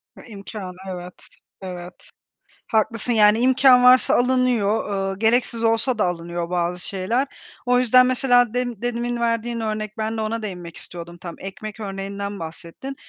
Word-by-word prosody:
Ha, -, -, -13 dB
imkân... 200 Hz, -3 st, -8 dB
Evet, 180 Hz, -1 st, -8 dB, 0.3 s
evet. 180 Hz, -1 st, -7 dB, 0.7 s
Haklısın. 230 Hz, +1 st, 0 dB
Yani 210 Hz, 0 st, +5 dB
imkân 255 Hz, 0 st, +5 dB
varsa 250 Hz, 0 st, +6 dB
alınıyor, 225 Hz, -6 st, +1 dB
eee, -, -, -5 dB
gereksiz 230 Hz, +1 st, +1 dB
olsa 230 Hz, +2 st, +2 dB
da 210 Hz, -, +2 dB
alınıyor 170 Hz, -1 st, -3 dB
bazı 180 Hz, 0 st, -1 dB
şeyler. 200 Hz, +9 st, -1 dB, 0.4 s
O 250 Hz, 0 st, +3 dB
yüzden 255 Hz, +1 st, +5 dB
mesela 245 Hz, -2 st, +3 dB
dem 245 Hz, -4 st, -2 dB
demin 240 Hz, 0 st, -2 dB
verdiğin 230 Hz, 0 st, -1 dB
örnek, 215 Hz, 0 st, -3 dB
ben 220 Hz, +1 st, -2 dB
de 220 Hz, -, -1 dB
ona 225 Hz, +1 st, -2 dB
değinmek 180 Hz, -5 st, -7 dB
istiyordum 170 Hz, 0 st, -8 dB
tam, 170 Hz, -1 st, -8 dB
ekmek 205 Hz, +3 st, -8 dB
örneğinden 200 Hz, 0 st, -5 dB
bahsettin. 170 Hz, +11 st, -8 dB
215 Hz, 145 wpm, -22 LUFS, 190-245 Hz, 0.7 s, varsa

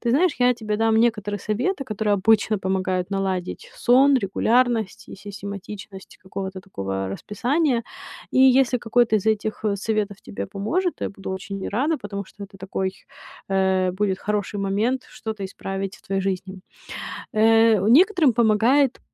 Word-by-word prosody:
Ты 235 Hz, -, 0 dB
знаешь, 325 Hz, +6 st, +3 dB
я 250 Hz, 0 st, +4 dB
тебе 215 Hz, -2 st, -3 dB
дам 225 Hz, 0 st, +2 dB
некоторые 210 Hz, -3 st, +1 dB
советы, 255 Hz, -, -2 dB
которые 215 Hz, -3 st, 0 dB
обычно 215 Hz, +1 st, +3 dB
помогают 185 Hz, -1 st, -1 dB
наладить 195 Hz, -, -3 dB
сон, 270 Hz, -, +5 dB
регулярность 220 Hz, -, +1 dB
и -, -, -8 dB
систематичность 200 Hz, 0 st, -9 dB
какого-то 190 Hz, 0 st, -6 dB
такого 95 Hz, -, -4 dB
расписания. 245 Hz, -, 0 dB, 0.5 s
И -, -, 0 dB
если 260 Hz, -1 st, +5 dB
какой-то 230 Hz, -1 st, +2 dB
из 205 Hz, -, -3 dB
этих, 220 Hz, 0 st, 0 dB
э, 205 Hz, -1 st, +1 dB
советов 210 Hz, -1 st, -1 dB
тебе 100 Hz, 0 st, -6 dB
поможет, 310 Hz, -, -2 dB
я -, -, -2 dB
буду 195 Hz, -1 st, -8 dB
очень 190 Hz, +1 st, -5 dB
рада, 285 Hz, +9 st, 0 dB
потому 200 Hz, -1 st, -5 dB
что 200 Hz, +1 st, -11 dB
это 195 Hz, 0 st, -15 dB
такой, 190 Hz, 0 st, -3 dB, 0.5 s
э, 190 Hz, -1 st, +2 dB
будет 190 Hz, 0 st, -1 dB
хороший 205 Hz, -1 st, -2 dB
момент 215 Hz, +7 st, 0 dB
что-то 215 Hz, -3 st, -6 dB
исправить 195 Hz, +2 st, -5 dB
в -, -, -23 dB
твоей 195 Hz, 0 st, -2 dB
жизни. 190 Hz, 0 st, -3 dB, 0.7 s
Э, 225 Hz, 0 st, +5 dB
некоторым 325 Hz, -, +5 dB
помогает 235 Hz, +4 st, +3 dB
210 Hz, 145 wpm, -23 LUFS, 195-240 Hz, 0.7 s, сон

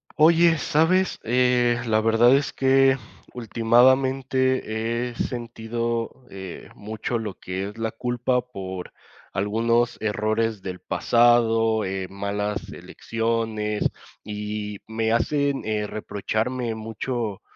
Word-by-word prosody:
Oye, 165 Hz, +1 st, +5 dB
¿sabes?, 165 Hz, +6 st, +2 dB
eh, 120 Hz, 0 st, +2 dB
la 110 Hz, -1 st, +2 dB
verdad 115 Hz, +3 st, +5 dB
es 140 Hz, +1 st, 0 dB
que 135 Hz, 0 st, +4 dB, 0.4 s
ultimadamente 125 Hz, 0 st, +2 dB
he -, -, -13 dB
sentido, 115 Hz, +1 st, -3 dB
eh, 95 Hz, -2 st, -8 dB
mucho 110 Hz, +3 st, -4 dB
lo 105 Hz, -3 st, -4 dB
que 95 Hz, +2 st, -4 dB
es 105 Hz, -, -13 dB
la 115 Hz, -1 st, -2 dB
culpa 125 Hz, +2 st, 0 dB
por 95 Hz, -7 st, -7 dB, 0.4 s
algunos 115 Hz, +4 st, +1 dB
errores 110 Hz, 0 st, 0 dB
del 90 Hz, -1 st, -5 dB
pasado, 115 Hz, -2 st, +3 dB
eh, 95 Hz, 0 st, -3 dB
malas 100 Hz, +1 st, -3 dB
elecciones. 115 Hz, -2 st, -2 dB, 0.4 s
Y 105 Hz, 0 st, -5 dB
me 110 Hz, 0 st, -1 dB
hacen, 140 Hz, +4 st, +1 dB
eh, 105 Hz, -1 st, -1 dB
reprocharme 110 Hz, +4 st, -2 dB
mucho 110 Hz, -1 st, -4 dB
115 Hz, 105 wpm, -24 LUFS, 105-125 Hz, 0.4 s, Oye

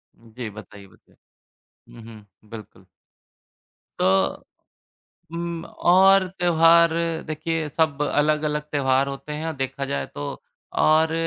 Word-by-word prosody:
जी, 115 Hz, 0 st, -9 dB
बताइये, 100 Hz, -1 st, -12 dB
बताइये। -, -, -26 dB, 0.8 s
हुँ, 115 Hz, -, -12 dB
हुँ, 105 Hz, -2 st, -16 dB
बिल्कुल। 110 Hz, -2 st, -12 dB, 1.1 s
तो, 190 Hz, +1 st, +1 dB, 0.9 s
उम्म 170 Hz, 0 st, -4 dB, 0.2 s
और 190 Hz, +1 st, +6 dB
त्योहार 170 Hz, -1 st, +5 dB, 0.3 s
देखिए 160 Hz, 0 st, -3 dB
सब 150 Hz, -1 st, 0 dB
अलग-अलग 150 Hz, 0 st, 0 dB
त्योहार 135 Hz, -1 st, +1 dB
होते 140 Hz, +2 st, -6 dB
हैं 155 Hz, +2 st, -5 dB
और 160 Hz, -, -3 dB
देखा 135 Hz, +1 st, -4 dB
जाए 70 Hz, -, -3 dB
तो 70 Hz, -, -5 dB, 0.6 s
और 160 Hz, +1 st, +3 dB
150 Hz, 110 wpm, -23 LUFS, 125-165 Hz, 1.1 s, और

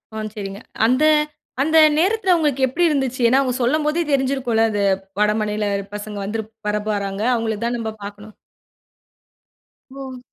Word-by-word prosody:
ஆ. -, -, -3 dB, 0.2 s
சரிங்க. 200 Hz, +1 st, -6 dB, 0.2 s
அந்த 255 Hz, +5 st, +3 dB, 0.6 s
அந்த 315 Hz, +3 st, +3 dB, 0.2 s
நேரத்துல 380 Hz, +2 st, +2 dB
உங்களுக்கு 290 Hz, -4 st, 0 dB
எப்படி 340 Hz, +8 st, -1 dB
இருந்துச்சு? 265 Hz, -4 st, -1 dB
ஏன்னா 260 Hz, +3 st, +4 dB
அவுங்க 255 Hz, -2 st, 0 dB
சொல்லும் 300 Hz, +5 st, +1 dB
போதே 315 Hz, +3 st, +1 dB
தெரிஞ்சிருக்கும்ல, 260 Hz, -4 st, +1 dB
அது 205 Hz, -1 st, -1 dB, 0.4 s
வடமாநில 210 Hz, 0 st, +1 dB, 0.3 s
பசங்க 210 Hz, 0 st, -6 dB
வந்துருப் 220 Hz, +2 st, -4 dB, 0.2 s
வரப்போறாங்க. 205 Hz, -1 st, -2 dB
அவுங்களுக்கு 225 Hz, -1 st, -2 dB
தான் 240 Hz, -, -1 dB
நம்ம 220 Hz, -1 st, -3 dB
பாக்கணும். 205 Hz, +1 st, -9 dB, 1.6 s
ஓ! 265 Hz, -2 st, -7 dB
230 Hz, 135 wpm, -21 LUFS, 210-275 Hz, 1.6 s, ஏன்னா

